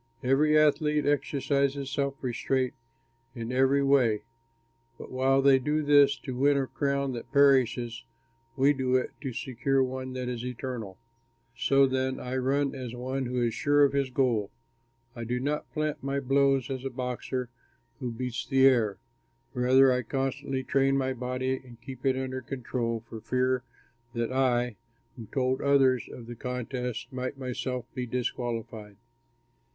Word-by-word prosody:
Every 150 +4 +4
athlete 150 0 +3
exercises 140 -1 0
self 140 0 -1
restraint 130 +1 0 0.6
in 115 0 -5
every 135 +2 +3
way; 125 -6 +3 0.7
but - - -10
while 135 +1 +2
they 135 -1 +6
do 150 +4 0
this 145 -1 +5
to 130 - -5
win 140 +2 +3
a 135 - +1
crown 140 0 -1
that 120 - -7
perishes, 125 -4 +3 0.5
we 140 +2 +5
do 130 -2 0
it 130 - +1
to 135 - -3
secure 130 +3 0
one 130 0 -4
that 130 -1 -4
is 120 -1 -4
eternal. 125 -5 -5 0.6
So 135 +3 +4
then 130 0 -1
I 125 +1 -4
run 135 +2 +1
as 125 -3 -6
one 130 +1 -3
who 125 0 -2
is 115 -1 0
sure 145 0 +3
of 140 -1 +3
his 140 -1 +1
goal. 120 -6 +1 0.7
I 120 - -5
do 120 +2 -2
not 145 +3 -2
plant 155 -1 -2
my 140 +1 -1
blows 135 -1 +2
as 130 -1 -4
a 135 - -2
boxer 125 0 -4 0.5
who 125 -4 -3
beats 120 0 -4
the 135 -1 +4
air; 115 -7 +4 0.6
rather 130 +1 +5
I 125 0 +1
constantly 135 +1 -2
train 135 +1 +2
my 130 -1 0
body 130 +1 -2
and 120 -2 -14
keep 130 +2 -6
it 130 -1 +2
under 130 0 -3
control 120 -3 -3
for 110 -2 -8
fear 130 +1 +1 0.5
that 115 +1 -1
I, 125 -3 +1 0.4
who 115 -4 -9
told 130 +1 0
others 135 -3 +3
of 120 - -9
the 120 - -7
contest, 125 0 -4
might 130 +1 -4
myself 125 -1 -4
be 125 -2 -4
disqualified. 115 -3 -4
130 Hz, 155 wpm, -28 LUFS, 125-135 Hz, 0.7 s, they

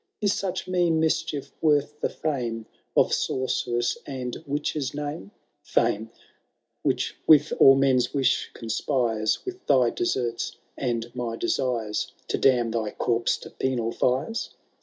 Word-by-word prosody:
Is 205 -2 +2
such 190 -1 -3
mean 175 -3 +2
mischief 155 -3 -1
worth 150 -1 +2
the - - +1
fame 120 -7 -3 0.3
Of - - +4
sorceress 120 -2 0
and 125 -3 -4
witch's 145 -1 -2
name? 145 -8 -5 0.3
Fame, 110 +2 0 0.7
which - - 0
with 155 -1 +6
all 135 - +9
men's 135 -2 +3
wish 135 -2 +1
conspires. 115 -2 0
With 370 -1 -6
thj 125 -3 +4
deserts 120 -1 -1 0.2
and 120 -2 -2
my 120 -2 -3
desires, 115 -3 -1 0.2
To - - 0
damn 120 -3 +3
thy 110 -2 -2
corpse 115 -1 +1
to - - -10
penal 120 -3 -1
fires 130 - -1
130 Hz, 130 wpm, -26 LUFS, 115-150 Hz, 0.7 s, all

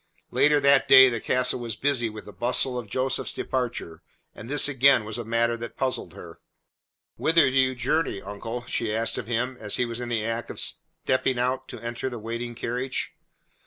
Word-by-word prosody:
Later 150 0 +4
that 140 -1 +4
day 130 -1 +9
the 115 -2 -3
castle 125 +2 +2
was 115 -3 -4
busy 130 -4 0
with 105 -1 -10
the 105 - -11
bustle 125 +1 0
of 115 -4 -9
Joseph's 130 +4 -1
departure, 125 -10 -3 0.3
and 115 - -10
this 145 +1 +4
again 135 -4 +4
was 110 +2 -4
a - - -3
matter 115 +1 +1
that 115 0 -8
puzzled 130 -10 -2
her. 85 -1 -12 0.8
"Whither 160 -4 +3
do - - -5
you 130 -1 +3
journey, 155 -2 -1
uncle?" 115 +5 -7
she 115 -2 -2
asked 115 +1 +1
of - - -7
him 125 +2 -2
as 105 - -1
he 125 - +1
was 115 0 -6
in 120 -1 -5
the 115 -2 -1
act 115 +1 -3
of - - -7
stepping 130 -1 -1
out 130 +2 -1
to - - -8
enter 120 +2 -4
the 120 - -7
waiting 115 +2 -5
carriage. 125 +2 -3
120 Hz, 200 wpm, -25 LUFS, 115-130 Hz, 0.8 s, day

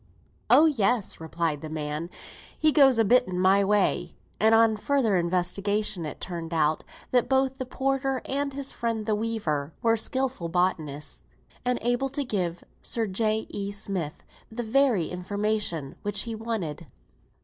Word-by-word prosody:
"Oh, 310 - +7
yes," 245 -7 +1
replied 160 -2 -2
the 155 - -6
man. 155 +1 -4 0.5
"He 310 0 +4
does 270 -5 +6
a 225 - +4
bit 250 +4 +4
in 180 -1 -3
my 190 +2 +4
way;" 195 -3 +1 0.2
and, 220 +2 +5
on 225 -1 +5
further 230 -2 +1
investigation, 180 +1 0
it 150 - -7
turned 170 -2 -5
out, 155 -1 +1 0.3
that 245 -2 +2
both 265 0 +1
the 260 - -4
porter, 270 0 -1
and 280 +1 -1
his 275 0 -3
friend 230 -2 -2
the 215 - +1
weaver, 205 -10 -2
were 225 -1 +4
skilful 255 -5 -2
botanists, 160 -5 -1 0.4
and 250 0 +1
able 245 +3 +1
to 285 +2 -2
give 180 -7 -2 0.2
Sir 230 -1 0
J. 215 +2 0
E. 200 -1 -3
Smith 195 -6 -3 0.3
the 240 +2 -4
very 235 -6 +3
information 190 -5 -2
which 205 -1 -1
he 230 - -4
wanted. 200 -9 -4
210 Hz, 155 wpm, -26 LUFS, 175-245 Hz, 0.5 s, Oh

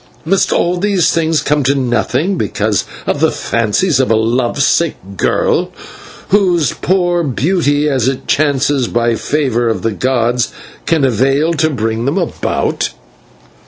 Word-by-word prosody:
Must 195 +3 +1
all 175 +1 +1
these 195 -2 +1
things 160 -1 0
come 150 0 +1
to 135 +1 +1
nothing 130 - 0
because 105 - -1 0.2
of - - -1
the - - +3
fancies 115 - 0
of 130 - +1
a 115 - +3
love 120 +4 0
sick 165 +4 +2 0.2
girl, - - 0 0.6
whose 180 - +2
poor 175 -2 0
beauty, 150 +1 0
as 130 -5 0
it 135 -1 -3
chances 140 -3 +1
by 120 0 0
favour 120 -1 -1
of 105 -5 -2
the 115 - 0
gods, 120 +1 0 0.4
can 160 -4 +2
avail 135 +7 +1
to 155 0 +1
bring 115 -3 -2
them 140 +7 0
about?" 175 -5 -1
140 Hz, 145 wpm, -14 LUFS, 120-165 Hz, 0.6 s, the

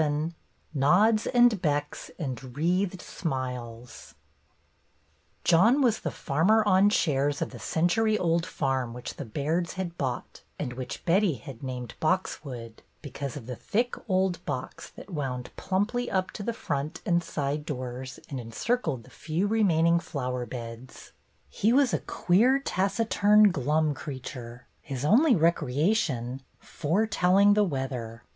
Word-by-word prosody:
VII 155 +2 0 0.4
*'nods 200 +10 +4
and 240 -5 +4
becks, 145 -2 -1
and 130 -4 -6
wreathed 180 +3 0
smiles 125 -5 -5 0.7
" - - -40
J 170 - +4
OHN 235 - +5
was 230 -4 +3
the - - -3
farmer 185 +10 +2
on 195 +1 +5
shares 145 -7 +1
of - - -3
the - - -9
century 215 +7 +1
old 170 -2 +1
farm 135 -8 -2
which 125 - -7
the 145 - -5
Bairds 155 +9 -1
had 175 -2 -5
bought, 130 -3 -4 0.2
and 125 -4 -4
which 125 0 -7
Betty 180 -1 +3
had 125 +1 -10
named 125 -2 -5
^'Boxwood,"' 140 -9 -2 0.2
because 140 -1 -5
of 125 - -9
the 125 +1 -5
thick 240 - -1 0.2
old 185 -2 +1
box 130 -4 -5
that 200 - -13
wound 130 -6 -4
plumply 220 +6 -1
up 190 -1 0
to - - -7
the 235 - -1
front 150 -7 -4
and 175 -3 +2
side 150 -2 -2
doors 130 -2 -6
and 135 - -5
encircled 130 - -2
the - - -18
few 165 +5 -2
remaining 170 -6 +3
flower 125 -6 -4
beds. 115 0 -9 0.4
He 205 - +1
was 265 -1 +4
a - - +2
queer, 230 +10 +3
taciturn, 210 -2 +3
glum 150 +1 +1
creature, 125 -3 -8 0.2
his 135 -1 -5
only 250 - +5
recreation 150 - +1 0.2
foretelling 200 +3 +2
the 210 0 +4
weather. 130 - -4
155 Hz, 140 wpm, -27 LUFS, 130-195 Hz, 0.7 s, OHN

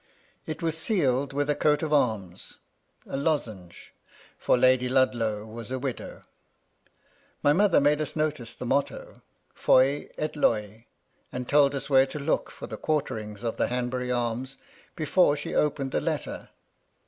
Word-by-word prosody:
It 155 +1 -5
was 165 -1 +1
sealed 140 - +2
with 145 +1 -1
a 150 - +2
coat 150 +1 +1
of 155 -1 -1
arms, 110 -10 -1 0.2
— - - -46 0.2
a - - -6
lozenge, 115 - -3 0.2
— - - -26
for - - +2
Lady 130 0 +3
Ludlow 115 -5 +1
was 115 +1 -8
a 130 - -2
widow. 130 -2 -6 1.2
My 145 - +5
mother 195 +1 +4
made 145 +1 +2
us 155 - -4
notice 155 -7 -2
the - - -7
motto, 140 +3 -2 0.2
" - - -45
Foy 135 +3 +3
et 155 0 -3
Loy," 110 -4 0 0.4
and 125 0 -5
told 145 -1 +4
us 135 0 -4
where 135 -1 +5
to 135 - -7
look 145 +2 -1
for - - -9
the - - -7
quarterings 115 -9 -3
of 115 -1 -2
the - - +1
Hanbury 125 0 -2
arms 125 +2 -2 0.4
before 155 -1 +3
she 145 - -5
opened 140 -3 0
the - - 0
letter. - - -4
135 Hz, 165 wpm, -27 LUFS, 120-150 Hz, 1.2 s, My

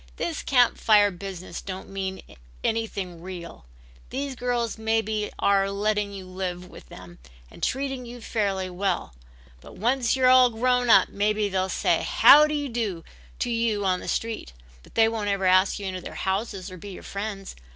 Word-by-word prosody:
"This 330 -3 -3
Camp 250 -3 +3
Fire 205 -2 +5
business 185 0 -7
don't 190 -1 -7
mean 190 -1 -5 0.4
anything 195 -6 -2
real. 175 - -9 0.4
These 275 +1 -3
girls 240 -2 -2
maybe 220 -1 0
are 195 -1 +2
letting 205 +1 -1
you 195 -2 -8
live 185 -1 -5
with - - -14
them 90 -1 -12 0.3
and - - -14
treating 270 -2 -2
you 245 +1 -9
fairly 200 -5 -1
well 185 - -2 0.5
but - - -14
once 245 +3 +1
you're 255 -1 +6
grown 245 +1 +1
up, 195 -4 +6
maybe 210 0 0
they'll 190 0 -1
say - - +1
'Howdy 300 0 +6
do' 215 -8 -3 0.3
to 245 - -2
you 230 -3 0
on 185 -1 +1
the - - -9
street, 225 - -3 0.3
but - - -20
they 225 0 +5
won't 220 -2 -2
ever 200 -1 0
ask 185 +1 +4
you 205 - -6
into 185 -1 -4
their - - -9
houses 195 -1 -3
or 185 - -9
be 200 +4 -9
your - - -10
friends. 200 -1 -6
205 Hz, 170 wpm, -25 LUFS, 190-235 Hz, 0.5 s, you're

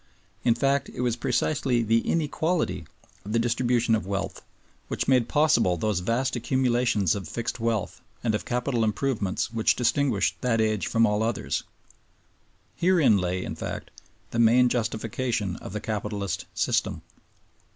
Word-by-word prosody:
In 115 - +3
fact, 140 0 +1
it - - -6
was 120 -2 +1
precisely 125 0 0
the 115 +1 +3
inequality 160 +5 -1 0.4
of 105 - -6
the - - +3
distribution 120 0 +1
of 110 -4 0
wealth 100 -1 -3 0.5
which - - -2
made 125 -3 +3
possible 120 - +3
those 105 +1 0
vast 115 +9 0
accumulations 120 -5 +1
of 100 -5 -5
fixed 120 +6 -4
wealth 115 -3 -2 0.2
and 115 -3 +1
of 105 - -1
capital 125 -1 -1
improvements 110 -2 -1
which 110 -1 +2
distinguished 125 -3 +1
that 120 -3 +1
age 110 -2 +1
from 115 0 +3
all 105 -1 +1
others. 115 +1 -1 1.2
Herein 170 - +4
lay, 90 0 -1
in - - -4
fact, - - -6 0.4
the 115 - -2
main 120 +2 +5
justification 110 -3 -1
of - - -9
the 105 - -3
Capitalist 105 -2 -3
System. - - 0
115 Hz, 145 wpm, -26 LUFS, 105-125 Hz, 1.2 s, main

